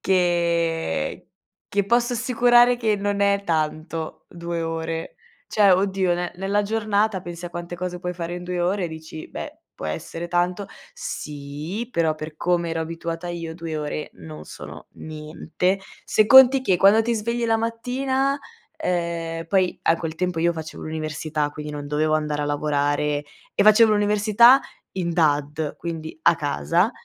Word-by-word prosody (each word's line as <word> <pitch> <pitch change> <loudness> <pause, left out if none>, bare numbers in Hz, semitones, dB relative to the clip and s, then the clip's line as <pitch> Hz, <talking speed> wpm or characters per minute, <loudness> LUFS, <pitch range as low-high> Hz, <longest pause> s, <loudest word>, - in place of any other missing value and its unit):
Che 170 - +1 0.5
che 200 0 +1
posso 240 +3 +2
assicurare 245 0 +4
che 220 -3 +1
non 200 0 -1
è 200 0 +3
tanto, 160 -1 -2
2 170 -1 -4
ore. 165 0 -4 0.3
Cioè 205 -2 +4
oddio, 190 -1 +2
ne 175 0 -3
nella 195 +2 0
giornata, 210 -1 0
pensi 175 -1 -8
a 175 - -5
quante 175 0 -6
cose 180 0 -4
puoi 180 0 -4
fare 170 0 -4
in 180 - -7
2 180 0 -2
ore 185 +2 0
e - - -2
dici: 160 0 -9
"Beh - - -7 0.2
può - - -9
essere 165 - -5
tanto". 180 +3 0 0.3
Sì, 150 +9 -5
però 160 -2 +1
per 155 0 -8
come 175 0 0
ero 165 0 -2
abituata 165 +1 -4
io, 165 -2 -5
2 165 -2 -5
ore 150 0 -4
non 80 -3 -10
sono - - -10
niente. 155 +4 -3 0.3
Se 215 - +3
conti 265 +1 +8
che, 190 -8 +2
quando 200 +4 +6
ti 235 +1 0
svegli 235 +2 -1
la 225 0 +3
mattina 260 +4 -1 0.4
ehm, 170 -2 -2
poi 185 0 +1
a 165 - +3
quel 165 -1 -4
tempo 180 0 -2
io 170 +1 +2
facevo 160 -1 -7
l'università, 155 -1 -2
quindi 150 0 -7
non 145 -1 -6
dovevo 155 +2 +1
andare 150 -1 -1
a - - -1
lavorare 145 0 0 0.3
e - - +3
facevo 215 +1 +7
l'università, 210 +5 +5 0.3
in 175 -2 -2
DAD, 150 -2 0
quindi, 160 -2 -6
a 170 - +6
casa 145 - +1
170 Hz, 160 wpm, -23 LUFS, 155-200 Hz, 0.5 s, conti